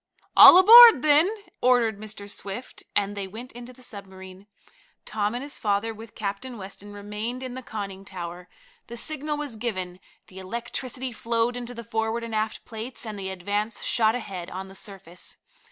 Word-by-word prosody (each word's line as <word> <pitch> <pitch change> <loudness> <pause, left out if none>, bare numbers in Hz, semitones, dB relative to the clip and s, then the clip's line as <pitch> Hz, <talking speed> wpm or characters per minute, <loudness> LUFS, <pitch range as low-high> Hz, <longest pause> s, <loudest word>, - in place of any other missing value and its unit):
"All - - +11
aboard, 450 - +10
then," 305 +4 +5 0.3
ordered 240 -4 +3
Mr. 210 -1 -7
Swift, 205 +3 -7
and 205 0 0
they 200 -1 -4
went 230 +6 -9
into 240 +1 -10
the 255 0 -16
submarine. 190 -3 -10 0.6
Tom 210 +1 -1
and 250 - -4
his 285 - -6
father, 210 +2 0
with 220 0 -12
Captain 220 +4 -5
Weston, 200 +1 -9
remained 210 +5 -5
in 255 -1 -6
the 260 - -6
conning 200 -5 -6
tower. 180 -2 -8 0.4
The 235 - -8
signal 300 +3 -3
was 290 -6 -5
given, 185 -6 -4 0.3
the 190 - -12
electricity 235 +5 -4
flowed 230 +1 -1
into 245 0 -6
the 235 - -7
forward 225 +1 -2
and 230 -1 -6
aft 215 0 -2
plates, 230 +3 -7
and 215 -2 -6
the 190 -1 -4
Advance 205 +4 -3
shot 220 -1 +2
ahead 195 -7 -6
on 190 +1 -7
the - - -12
surface. 190 -3 -9
220 Hz, 170 wpm, -25 LUFS, 200-245 Hz, 0.6 s, All